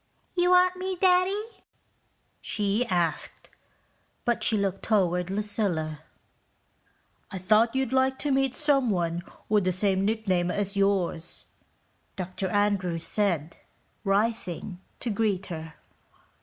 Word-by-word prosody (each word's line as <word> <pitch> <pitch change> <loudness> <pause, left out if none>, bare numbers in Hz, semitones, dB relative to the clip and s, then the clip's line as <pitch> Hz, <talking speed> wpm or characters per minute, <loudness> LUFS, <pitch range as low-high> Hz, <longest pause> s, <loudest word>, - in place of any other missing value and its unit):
"You 355 0 +3
wanted 365 0 +4
me, 375 0 -2
Daddy?" 370 +3 +3 1.0
she 210 +4 0
asked, 175 -3 -2 0.7
but 240 -1 +1
she 220 - +4
looked 195 -1 -1
toward 180 -4 +1
Lucilla. 195 -7 -1 1.3
"I 195 - -6
thought 215 +6 +3
you'd 265 -2 0
like 265 0 +2
to 290 - -1
meet 270 -1 +1
someone 215 - +1 0.3
with 210 -2 +3
the 185 - +1
same 190 +1 +1
nickname 195 -5 0
as 200 +1 0
yours," 195 -4 0 0.7
Dr. 185 +1 -4
Andrews 190 -4 0
said, 170 -7 0 0.5
rising 195 -3 -1 0.2
to 235 - -1
greet 200 -2 0
her. 160 -1 -8
200 Hz, 115 wpm, -27 LUFS, 180-240 Hz, 1.3 s, wanted